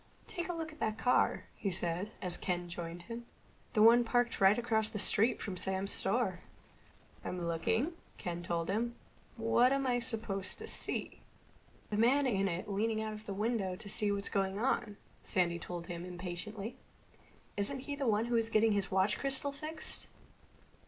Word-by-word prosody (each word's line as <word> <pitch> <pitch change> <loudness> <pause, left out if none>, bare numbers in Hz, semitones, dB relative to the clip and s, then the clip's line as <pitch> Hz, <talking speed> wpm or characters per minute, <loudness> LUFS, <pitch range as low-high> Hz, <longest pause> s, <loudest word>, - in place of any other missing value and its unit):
"Take 350 +1 -4
a - - 0
look 325 -2 -4
at 310 - -15
that 215 -1 -1
car," 250 +2 +3
he 200 - -2
said, 175 +2 0
as 180 -1 +2
Ken 175 -1 -2
joined 170 0 -6
him. 235 +3 -7 0.5
"The 215 - +5
one 235 +2 +8
parked 240 -1 +1
right 195 +2 +7
across 220 -2 +1
the - - -5
street 215 +3 +4
from 195 - -4
Sam's 190 +2 +1
store." 195 -3 +2 0.8
"I'm 180 -1 -3
looking," 225 - 0 0.2
Ken 175 -1 -4
told 170 -1 -1
him. 235 +5 -1 0.4
"What 235 +2 +4
am 275 0 +1
I 245 -1 +2
supposed 215 -5 -2
to - - -6
see?" - - -3 0.7
"The 205 - 0
man 260 +6 +4
in 195 -6 +2
it 180 +1 -3
leaning 215 +2 0
out 220 0 -3
of 215 0 -10
the 200 - -2
window 210 -3 0
to 200 - -9
see 210 0 +2
what's 200 0 -1
going 195 -1 0
on," 215 -3 0 0.2
Sandy 175 -4 +1
told 175 0 -5
him 170 0 -5
impatiently. 180 +5 -6 0.8
"Isn't 215 +7 -1
he 285 +2 -4
the 280 -3 -2
one 215 0 +3
who 240 - -2
was 225 -1 +2
getting 220 0 +4
his 200 -1 +1
watch 190 +2 +2
crystal 275 +1 0
fixed?" 310 +3 -7
210 Hz, 180 wpm, -34 LUFS, 190-235 Hz, 0.8 s, one